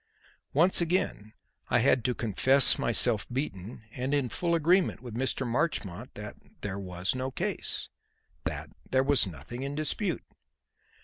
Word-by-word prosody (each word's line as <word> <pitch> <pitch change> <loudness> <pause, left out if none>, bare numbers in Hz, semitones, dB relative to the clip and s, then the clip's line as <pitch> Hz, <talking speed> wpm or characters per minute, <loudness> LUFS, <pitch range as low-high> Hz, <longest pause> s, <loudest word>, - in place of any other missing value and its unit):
Once 175 +5 +5
again 170 - 0 0.4
I 120 - +4
had 125 0 +4
to 125 -1 +1
confess 130 +5 +3
myself 115 -2 +3
beaten 115 -5 -4
and 130 +4 -1
in 135 -4 +1
full 170 +7 0
agreement 175 +3 +3
with 120 -3 -7
Mr. 130 +2 -1
Marchmont 120 - -2
that - - -7 0.2
"there 100 -1 -3
was 90 0 -2
no 130 +1 -2
case"; 130 - -3 0.6
that - - -4 0.2
"there 130 0 +3
was 140 -6 +3
nothing 90 - -7
in 140 +1 -3
dispute." 165 +4 -1
130 Hz, 140 wpm, -29 LUFS, 110-145 Hz, 0.6 s, Once